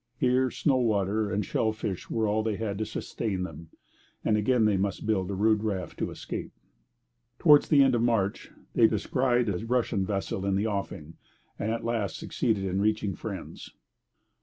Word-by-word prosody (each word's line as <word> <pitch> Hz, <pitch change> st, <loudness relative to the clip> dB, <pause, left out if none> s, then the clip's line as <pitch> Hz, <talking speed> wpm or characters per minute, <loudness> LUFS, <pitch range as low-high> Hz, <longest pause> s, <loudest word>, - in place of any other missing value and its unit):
Here, 130 Hz, 0 st, +2 dB
snow 135 Hz, +1 st, +1 dB
water 105 Hz, -3 st, +1 dB
and 100 Hz, +1 st, -1 dB
shell 110 Hz, -, 0 dB
fish 110 Hz, -4 st, -5 dB
were 110 Hz, -1 st, 0 dB
all 105 Hz, +1 st, +1 dB
they 110 Hz, -1 st, -1 dB
had 100 Hz, -2 st, -3 dB
to 110 Hz, -, -2 dB
sustain 100 Hz, -5 st, -3 dB
them; 85 Hz, -3 st, -8 dB, 0.6 s
and 110 Hz, -, +3 dB
again 110 Hz, +2 st, +3 dB
they 105 Hz, -2 st, +3 dB
must 95 Hz, +1 st, -1 dB
build 100 Hz, -4 st, 0 dB
a 100 Hz, -, -2 dB
rude 105 Hz, +2 st, +3 dB
raft 95 Hz, -5 st, -3 dB
to -, -, -1 dB
escape. -, -, -6 dB, 0.8 s
Towards 145 Hz, -1 st, +6 dB
the 140 Hz, -2 st, +6 dB
end 135 Hz, -1 st, +3 dB
of 120 Hz, -, +2 dB
March 115 Hz, -4 st, 0 dB, 0.2 s
they 115 Hz, -, +6 dB
descried 120 Hz, +3 st, +1 dB
a 100 Hz, 0 st, -2 dB
Russian 115 Hz, -4 st, 0 dB
vessel 95 Hz, -1 st, -2 dB
in 100 Hz, -1 st, +1 dB
the 100 Hz, +3 st, +1 dB
offing, 100 Hz, -7 st, -4 dB, 0.4 s
and 110 Hz, -, -1 dB
at 115 Hz, -, -3 dB
last 115 Hz, -4 st, -1 dB
succeeded 105 Hz, -4 st, -1 dB
in 95 Hz, +1 st, -1 dB
reaching 105 Hz, -1 st, +1 dB
friends. -, -, -8 dB
110 Hz, 180 wpm, -28 LUFS, 100-115 Hz, 0.8 s, Towards